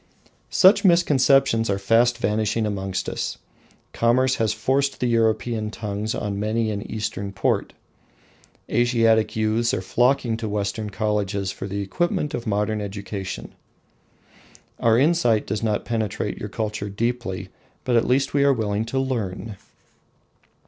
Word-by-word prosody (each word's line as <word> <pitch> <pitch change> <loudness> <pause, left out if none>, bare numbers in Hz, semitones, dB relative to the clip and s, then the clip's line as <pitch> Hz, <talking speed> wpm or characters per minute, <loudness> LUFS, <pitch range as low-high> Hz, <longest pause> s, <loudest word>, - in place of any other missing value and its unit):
Such 195 +2 +5
misconceptions 135 - +4
are 100 - +1
fast 115 +4 +3
vanishing 110 0 0
amongst 95 -3 -3
us. - - -3 0.6
Commerce 130 +3 +2
has 110 -2 +1
forced 135 +5 0
the - - 0
European 115 -1 +1
tongues 105 0 -4
on 100 -1 -3
many 110 +1 0
an 100 -1 -3
Eastern 105 -2 -3
port. 95 - -1 0.9
Asiatic 115 -2 +2
youths 110 +2 +1
are - - -3
flocking 120 -2 +1
to 110 -2 -4
Western 105 +1 -2
colleges 100 -1 -1
for 95 - -6
the 100 +1 -3
equipment 150 - -1
of 120 - -4
modern 105 +1 0
education. 100 -1 -6 1.3
Our 115 -1 +4
insight 130 -6 +3
does 105 - -3
not 110 -2 -1
penetrate 110 -4 -2
your - - -5
culture 105 -2 -3
deeply, 115 -2 -3 0.3
but 125 - 0
at 115 - +3
least 135 +2 +1
we 140 -1 +3
are 140 0 +5
willing 110 -2 -1
to 115 +4 -4
learn. 115 -5 -3
110 Hz, 135 wpm, -23 LUFS, 105-120 Hz, 1.3 s, Such